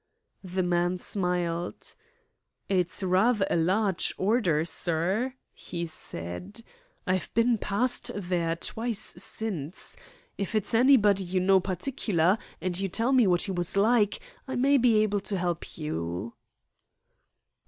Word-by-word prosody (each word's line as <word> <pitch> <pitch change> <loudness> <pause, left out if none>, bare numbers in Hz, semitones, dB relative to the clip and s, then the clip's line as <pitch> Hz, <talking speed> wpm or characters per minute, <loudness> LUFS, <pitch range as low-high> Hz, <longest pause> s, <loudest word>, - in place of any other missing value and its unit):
The 185 0 -2
man 175 +1 +1
smiled. 180 -2 -2 0.7
"It's 185 0 +1
rather 195 +3 +3
a - - +2
large 185 +3 +1
order, 190 -7 +1
sir," 185 +10 0 0.2
he 170 -1 -5
said. 160 - -5 0.4
"I've 185 -2 -1
been 230 0 +3
past 245 +6 0
there 175 -4 -1
twice 225 +6 -3 0.2
since. 200 -8 -3 0.4
If 200 +2 -3
it's 215 +2 -1
anybody 225 -5 +5
you 185 +1 -1
know 190 +1 +4
particular, 190 - 0 0.2
and 185 -1 -2
you 195 - -1
tell 230 +7 0
me 250 -5 +5
what 180 -1 +3
he 195 - -1
was 175 +1 -1
like, 210 0 +3 0.3
I 260 - -4
may 275 +3 +3
be 235 -2 +4
able 205 -1 0
to 200 0 -3
help 175 -2 -3
you." 90 - -4
190 Hz, 130 wpm, -27 LUFS, 175-220 Hz, 0.7 s, anybody